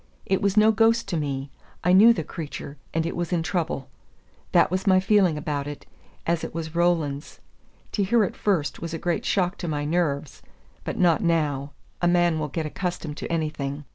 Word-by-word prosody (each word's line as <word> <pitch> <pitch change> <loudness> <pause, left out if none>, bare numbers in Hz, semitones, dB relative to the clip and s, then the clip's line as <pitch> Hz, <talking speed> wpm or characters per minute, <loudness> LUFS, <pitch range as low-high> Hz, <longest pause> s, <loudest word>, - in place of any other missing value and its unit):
It 190 - +1
was 200 +1 +1
no 215 +1 +7
ghost 225 +1 +3
to 175 - -1
me. 140 -2 -3 0.3
I 180 - +4
knew 215 +5 +8
the 170 -8 0
creature, 150 -2 -7 0.2
and 165 0 0
it 165 - -3
was 175 0 -3
in 170 -2 +1
trouble. 160 -6 -2 0.6
That - - +4
was 185 +2 -2
my 185 -1 +6
feeling 190 -4 +3
about 145 -2 -3
it, 145 -1 -7 0.4
as 170 0 0
it - - -6
was 160 -1 -4
Roland's. 165 -4 0 0.5
To 205 - 0
hear 220 +3 +3
it 190 - -2
first 170 -9 0
was 165 -1 -4
a - - -2
great 175 +1 -2
shock 185 -1 0
to 175 - -4
my 145 -2 -2
nerves, 150 -3 -1 0.4
but - - -4
not 175 +3 +3
now; 150 -5 0 0.3
a 175 - +3
man 175 -2 +3
will 150 - -1
get 155 +3 -3
accustomed 165 -2 -4
to - - -5
anything. 150 -3 -2
165 Hz, 200 wpm, -25 LUFS, 150-185 Hz, 0.6 s, knew